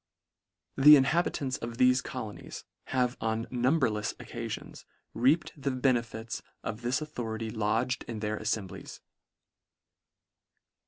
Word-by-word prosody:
The 150 +2 +10
inhabitants 140 -2 +1
of 115 0 -6
thefe 125 0 +4
colonies 110 -5 -7 0.2
have 125 -1 0
on 110 0 -1
numberlefs 120 -4 +1
occafions, 115 -2 -7 0.3
reaped 140 +8 +2
the 140 -2 -2
benefits 120 -3 -1 0.2
of 110 - -4
this 125 +4 0
authority 115 -7 -4
lodged 115 +4 0
in 115 -2 -5
their 105 0 -2
affemblies. 105 -4 -4
120 Hz, 105 wpm, -30 LUFS, 110-130 Hz, 0.3 s, The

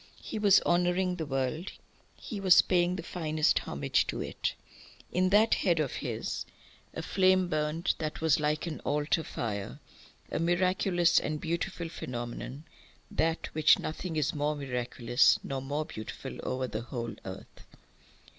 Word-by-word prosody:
He 220 - -4
was 200 -2 +6
honouring 180 +1 +1
the 160 -3 -4
world; 135 +6 -2 0.4
he 215 - -7
was 190 -2 +7
paying 180 -1 +2
the 175 - -5
finest 155 -3 +1
homage - - 0
to - - -3
it. - - -3 0.6
In 185 +1 +2
that 210 +3 +5
head 175 -5 +2
of 150 -4 0
his - - -3 0.5
a - - -4
flame 185 -1 +3
burnt 155 +1 0
that 155 -1 -3
was 160 0 +3
like 150 +1 0
an 165 -3 -4
altar 150 +2 0
fire, 100 -8 -4 0.5
a - - -1
miraculous 175 +1 +3
and 155 0 -3
beautiful 170 +1 -3
phenomenon, 125 -1 -6 0.5
than 165 +1 +1 0.2
which 155 0 +5
nothing 160 +2 -4
is 155 -3 +1
more 150 +1 0
miraculous 125 -3 +2
nor 135 -1 -3
more 145 +3 -2
beautiful 110 -5 -7
over 130 0 -2
the 110 -3 -4
whole 120 -1 -5
earth. 95 0 -9
155 Hz, 145 wpm, -30 LUFS, 135-180 Hz, 0.6 s, was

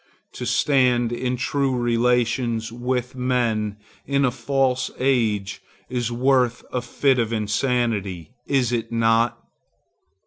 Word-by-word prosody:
To - - -5
stand 125 -4 +2
in 125 +1 -2
true 135 0 0
relations 120 -1 +1
with 125 +1 -2
men 120 -5 0 0.3
in 140 0 +1
a 125 - +2
false 130 +1 0
age 110 -7 0 0.3
is 120 -2 -2
worth 125 0 +1
a 125 - 0
fit 130 +2 +1
of 115 -1 0
insanity, 105 -4 -1 0.2
is 130 -4 +1
it 120 -2 -2
not? 115 +1 +2
120 Hz, 115 wpm, -23 LUFS, 115-130 Hz, 0.3 s, stand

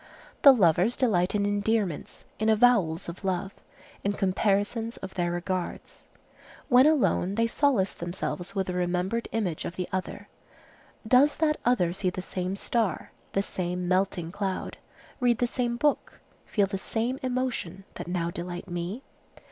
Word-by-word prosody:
The 280 - +10
lovers 195 - +3
delight 190 -7 +2
in 200 -1 +1
endearments, 205 -4 -1
in 220 +1 +2
avowals 215 -7 +3
of 170 +3 -8
love, 190 +1 -1 0.5
in 200 - +1
comparisons 205 +4 0
of 190 0 -8
their 175 -2 -1
regards. 175 +1 -4 0.6
When 255 +3 +7
alone, 250 - +2
they 230 +1 +2
solace 230 -5 +2
themselves 175 +2 -5
with 190 -1 0
the 180 - -3
remembered 180 +5 -1
image 190 -8 -1
of 170 - -5
the 180 -1 -3
other. 185 0 -4 0.8
Does 260 +5 +5
that 305 -2 +2
other 185 -9 +2
see 185 0 0
the 180 0 -5
same 185 0 -3
star, 225 0 -1 0.2
the 195 - +1
same 180 -2 -3
melting 185 -2 0
cloud, 195 -1 -3 0.4
read 245 -3 +3
the 245 - +2
same 240 0 -1
book, 295 +2 0 0.3
feel 205 -3 +2
the 195 0 -4
same 235 +6 -2
emotion, 245 -8 -2
that - - -7
now 175 -1 -1
delight 175 +1 -6
me? 175 +8 -4
195 Hz, 150 wpm, -27 LUFS, 180-230 Hz, 0.8 s, The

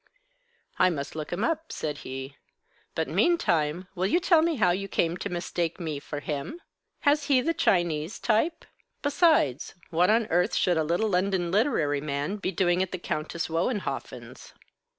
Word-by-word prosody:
"I - - +6
must 145 -5 -4
look 155 -1 -5
'em 175 - -2
up," 325 0 -1
said 150 -2 -4
he. 135 +1 -7 0.6
"But - - -1
meantime, 180 - +1
will 185 0 0
you 345 - +3
tell 340 -2 +4
me 330 0 +1
how 185 -8 +3
you 195 +2 -2
came 170 -3 0
to - - -4
mistake 175 -1 -2
me 155 -4 -3
for 145 0 -6
him? 150 - -4 0.4
Has 290 0 +3
he 275 -3 +4
the 330 +6 0
Chinese 175 - +1
type? 240 +10 0 0.4
Besides, 285 - +2 0.2
what 175 +3 +3
on 225 +1 +3
earth 175 +2 +2
should 175 -2 +2
a 160 - +2
little 175 +8 0
London 180 -2 0
literary 180 - +1
man 145 +6 -2
be 195 - -2
doing 175 0 +2
at 190 - -2
the 185 - -3
Countess 160 -1 -3
Wohenhoffen's?" 180 +7 -4
180 Hz, 170 wpm, -27 LUFS, 155-225 Hz, 0.6 s, I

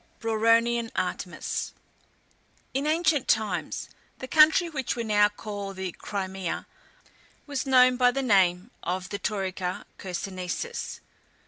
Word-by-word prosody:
BRAURONIAN 230 +1 +2
ARTEMIS. 180 -1 -3 1.0
In 275 +3 0
ancient 315 -3 +2
times, 205 -7 0 0.3
the 260 - -7
country 315 +4 +6
which 270 -6 -2
we 235 - -2
now 210 -2 +4
call 205 -2 -6
the 190 -1 -4
Crimea, 190 -1 -4 0.8
was 285 -2 -3
known 255 -1 +6
by 250 -1 +5
the 270 +2 -1
name 190 -2 +3
of 185 +1 -3
the 200 - -4
Taurica 190 -3 -3
Chersonnesus. 185 - -4
215 Hz, 115 wpm, -27 LUFS, 190-255 Hz, 1.0 s, country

